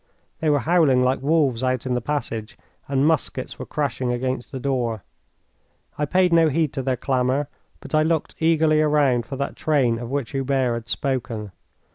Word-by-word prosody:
They 160 - +1
were 145 -2 +3
howling 150 -5 +3
like 130 +1 +1
wolves 140 -5 +2
out 130 -1 0
in 130 - -1
the 125 - 0
passage, 115 -5 -4 0.3
and 135 0 +1
muskets 150 -4 -1
were - - -6
crashing 130 -4 -2
against 130 +1 -3
the 135 - -5
door. 120 -5 -1 0.9
I 150 - -1
paid 180 +3 +2
no 165 -1 +5
heed 155 0 0
to 135 - -2
their 130 -1 -1
clamour, 130 +2 0 0.3
but - - -11
I 155 - +4
looked 160 0 0
eagerly 160 -1 +3
around 145 -6 +2
for 135 - -5
that 140 +1 -3
train 130 -7 +1
of 120 -1 -6
which 140 -3 -2
Hubert 135 -2 0
had 115 -1 -6
spoken. 115 -6 -2
135 Hz, 180 wpm, -23 LUFS, 125-150 Hz, 0.9 s, no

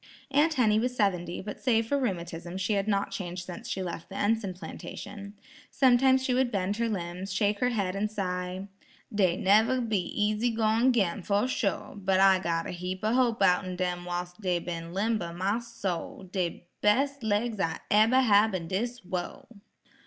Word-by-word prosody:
Aunt 305 +3 +3
Henny 215 -4 +3
was 250 +2 -1
seventy, 180 -6 0
but 210 +1 -7
save 230 -4 +2
for 280 +5 0
rheumatism 175 -6 -3
she 190 +3 0
had 200 0 0
not 200 -1 0
changed 180 -2 -5
since 175 -2 -8
she 190 - -2
left 170 -2 -6
the 195 - -9
Enson 205 -2 0
plantation. 200 +2 -8 0.3
Sometimes 260 0 +4
she 255 - +1
would 255 0 +2
bend 200 0 -1
her 230 0 0
limbs, 180 -1 -4
shake 205 +1 +1
her 250 - +2
head 200 -6 -1
and 210 +2 -1
sigh, 185 -1 -3 0.5
"Dey 185 -4 +2
neber 220 +6 +4
be 220 -5 0
easy 210 +5 0
goin' 225 +2 +3
'gin, 205 -5 +1
fuh 200 +4 +1
sho', 220 -6 -2
but 190 0 +2
I 190 -1 +6
got 165 -2 -1
a - - -4
heap 180 +1 -5
o' 215 +2 +2
hope 245 -2 +2
outen 180 0 +2
dem 180 -1 -2
whilst 175 +2 -5
dey 180 -3 +1
ben 170 -1 -5
limber, 195 -2 -1
my 195 +6 0
soul; 200 -6 -5
de 175 -3 -2 0.2
bes' 275 +7 +2
laigs 220 0 0
I'll 165 -3 0
eber 225 +5 +5
hab 210 -3 +4
in 170 -3 -4
dis 235 +6 -2
wurl." 180 -1 -5
200 Hz, 180 wpm, -28 LUFS, 180-225 Hz, 0.5 s, I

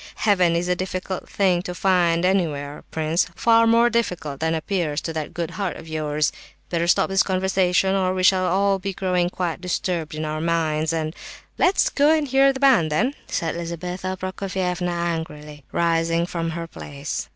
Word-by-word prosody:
Heaven 185 -5 +3
is 170 +1 0
a 180 - +2
difficult 185 +1 -4
thing 185 -3 +2
to 180 0 -6
find 175 -2 +2
anywhere, 150 -7 -1
prince; 160 +2 0
far 230 0 +4
more 230 +1 +5
difficult 180 - -2
than 160 0 0
appears 160 -2 -1
to 165 - -4
that 155 -1 -4
good 170 -1 -4
heart 195 -3 -3
of 160 - -11
yours. 155 -1 -1 0.4
Better 170 -1 0
stop - - +3
this 195 0 +3
conversation, 190 0 +1
or 190 -1 +1
we 185 0 -1
shall 185 0 +4
all 195 +2 +2
be 195 +1 -4
growing 180 -2 0
quite 180 -1 -3
disturbed 175 -3 -2
in 155 0 -3
our 155 0 -3
minds, 160 -2 0
and—" 160 -1 -2 0.4
"Let's 370 +2 +3
go 290 +1 +3
and 300 -2 -1
hear 270 +1 +4
the 265 - -6
band, 245 - +4
then," 240 - +1
said 165 -1 -2
Lizabetha 180 +2 -4
Prokofievna, 185 -1 -2
angrily 160 -4 -4
rising 165 0 +1
from 165 -1 -3
her 170 - -4
place. 75 - -6
175 Hz, 175 wpm, -23 LUFS, 160-190 Hz, 0.4 s, more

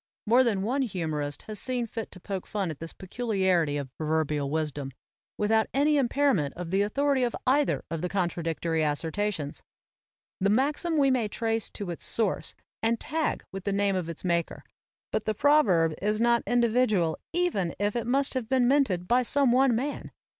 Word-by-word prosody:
More 240 +4 +5
than 205 -6 0
one 255 +6 0
humorist 155 - -3
has 215 -2 -5
seen 250 -2 -1
fit 225 -1 -6
to 185 - -12
poke 190 0 -5
fun 195 -5 -2
at 155 - -9
this 165 0 -6
peculiarity 190 -7 0
of 135 -3 -6
proverbial 155 -2 0
wisdom, 150 -2 -2 0.5
without 220 +1 +2
any 295 +2 +3
impairment 260 - +1
of 175 -1 -6
the 195 +1 +2
authority 275 +6 +1
of 245 -1 0
either 280 +3 +2
of 165 -2 -3
the 180 - -2
contradictory 170 -3 -1
assertions. 160 +1 -2 0.8
The 195 - +2
maxim 295 - +1
we 275 -2 +4
may 245 -4 +1
trace 225 +1 -1
to 195 -4 -5
its 170 - -5
source 220 -4 -1 0.3
and 230 0 +1
tag 315 +2 -2
with 195 -1 -6
the 200 - -1
name 200 0 +1
of 180 -3 -2
its 165 +2 -7
maker, 170 -2 -1 0.5
but 215 - -1
the 215 - 0
proverb 200 - +4
is 210 +2 0
not 235 0 +3
individual 230 -8 +2
even 330 - 0
if 205 +2 -1
it 235 -1 -2
must 270 +2 +1
have 250 -4 -3
been 255 -2 +3
minted 240 -11 +2
by 245 +2 +4
some 270 +1 +3
one 255 -1 +4
man. 275 +5 -3
210 Hz, 180 wpm, -27 LUFS, 170-250 Hz, 0.8 s, More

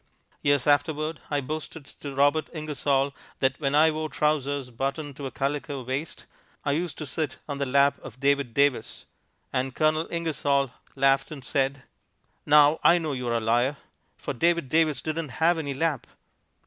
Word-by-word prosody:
Years 145 -3 +2
afterward 150 +2 +1
I 145 -1 0
boasted 155 +1 -6
to 140 -1 -9
Robert 145 +3 +3
Ingersoll 145 -3 0 0.2
that 135 -1 0
when 140 -2 0
I 160 +2 +6
wore 155 0 -3
trousers 145 -4 0
buttoned 140 +4 -3
to 140 - -4
a - - -7
calico 140 +1 -3
waist 135 +6 -4 0.4
I 145 - +2
used 160 0 -2
to 155 - -5
sit 145 0 -3
on 145 -2 -4
the 140 - -1
lap 140 +1 +3
of 125 +1 -11
David 140 -3 +1
Davis, 140 -5 +1 0.5
and 130 0 -1
Colonel 155 +1 +2
Ingersoll 145 -5 0 0.2
laughed 135 0 +3
and 140 -5 -8
said, 135 -1 0 0.6
"Now 150 +1 +6
I 175 - +7
know 160 -4 -2
you 125 -2 -4
are 115 0 +1
a - - 0
liar, 120 +5 +1 0.4
for - - -4
David 170 0 +1
Davis 155 -3 +2
didn't 160 -1 -3
have 165 +1 +3
any 140 -3 -3
lap." 150 -2 -1
145 Hz, 170 wpm, -26 LUFS, 135-155 Hz, 0.6 s, I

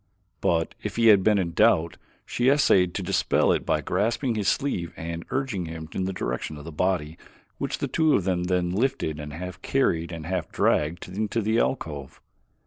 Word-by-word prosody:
But 80 -1 +1
if - - -5
he 115 -1 +5
had 100 -3 +7
been 105 +2 +3
in 90 -3 -1
doubt, 85 -4 +3 0.3
she 125 +2 +1
essayed 95 -11 +4
to 100 - -2
dispel 95 +2 +2
it - - -1
by - - +2
grasping 115 +7 0
his 105 -3 -2
sleeve 90 -12 -1
and 85 +1 -5
urging 130 -9 -2
him 80 -1 -7
in 95 - -2
the 95 - -1
direction 75 -2 -4
of 75 - -9
the 85 - -7
body 85 -1 -1 0.4
which - - -2
the - - -2
two 160 -2 +3
of 95 - +1
them 90 -1 0
then 90 -1 0
lifted 100 - -1
and 75 0 -6
half 90 +3 -7
carried 85 -11 0
and 80 -2 -6
half 90 -1 -3
dragged 75 +3 +1
into 105 +4 -2
the 110 +1 +1
alcove. 75 - -3
90 Hz, 195 wpm, -25 LUFS, 80-110 Hz, 0.4 s, had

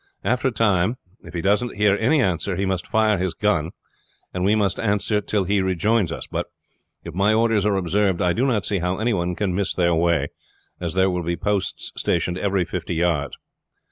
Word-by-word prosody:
After 125 +1 +1
a - - +1
time 110 0 +1 0.3
if - - -11
he 85 - -1
doesn't 105 +4 +1
hear 105 -1 +4
any 130 +7 +2
answer 95 +1 -1
he 95 +2 -1
must 95 -2 -2
fire 110 -3 +2
his 90 -1 -2
gun, - - +1 0.6
and 90 - -2
we 100 +3 +3
must 100 -3 0
answer 105 0 +1
till 105 0 0
he 100 +1 +1
rejoins 95 +1 +1
us. - - -5
But - - -4 0.6
if 85 - -8
my 100 +4 +2
orders 110 -2 +2
are 100 - +2
observed 95 0 +1
I 90 -1 +2
do 130 +4 +1
not 110 -7 0
see 100 -3 0
how 90 +2 -1
any 115 +2 0
one 90 -2 -1
can 100 -2 -1
miss 100 +1 -1
their 85 -1 +2
way, 80 -3 +1 0.5
as 85 -1 -4
there 95 0 +3
will 90 0 -2
be 85 0 -2
posts 100 +1 -2
stationed 90 +1 -1
every 95 -3 0
fifty 85 0 -4
yards. 80 -4 0
95 Hz, 205 wpm, -22 LUFS, 90-105 Hz, 0.6 s, hear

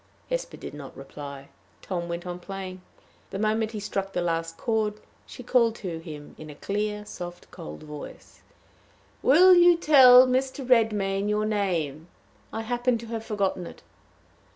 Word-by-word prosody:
Hesper - - -3
did - - -8
not 145 -2 -10
reply. 140 0 -9 0.3
Tom 175 -2 -4
went 170 +1 -4
on 175 0 -5
playing. 185 0 -7 0.5
The 195 - -5
moment 215 +2 0
he 215 - -4
struck 195 -1 -3
the 180 - -1
last 165 -1 -2
chord, 220 -2 0 0.3
she 250 - -10
called 235 -2 +3
to 175 -7 -5
him 150 -3 -10
in 155 - -9
a 150 - -10
clear, 210 +4 -3
soft, 175 -3 -9
cold 75 0 -9
voice: 150 -1 -11 0.8
"Will 360 +7 +7
you 350 -1 +6
tell 260 -6 +8
Mr. 260 +1 -1
Redmain 210 -5 +2
your 210 0 +1
name? 170 -8 -1 0.4
I 225 - -3
happen 245 +1 0
to 230 - -9
have 225 -1 -3
forgotten 195 -5 -2
it." - - -13
205 Hz, 155 wpm, -26 LUFS, 170-230 Hz, 0.8 s, tell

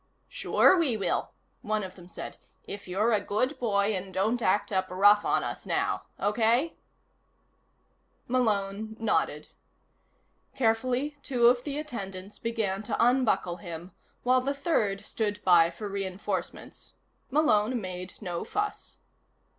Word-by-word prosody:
"Sure - - +4
we 270 -9 +2
will," 200 - -1 0.3
one 215 0 -1
of 185 -1 -7
them 180 -1 -14
said, - - -8 0.3
"if 200 -1 -8
you're 210 +6 +1
a 210 - +2
good 255 +8 -1
boy 205 -3 +1
and 190 +1 -5
don't 220 +6 0
act 200 0 +1
up 190 -1 0
rough 205 +3 +5
on - - +1
us - - -5
now. - - 0 0.2
Okay?" 230 +9 +2 1.5
Malone 220 -3 0
nodded. 225 -1 0 1.1
Carefully, 255 +4 +1
two 245 -4 +1
of 245 +1 +5
the 290 -1 -3
attendants 200 -9 -6
began 220 -4 -1
to 215 - -3
unbuckle 235 -8 +2
him 175 -1 -8 0.3
while 255 +1 +4
the 280 +2 -1
third 220 - 0
stood 210 -2 -2
by 170 -2 +6
for 205 +5 -7
reinforcements. 195 -1 -5 0.4
Malone 255 -5 +3
made 185 -2 -7
no 175 -3 -3
fuss. 415 0 -4
215 Hz, 130 wpm, -28 LUFS, 195-245 Hz, 1.5 s, by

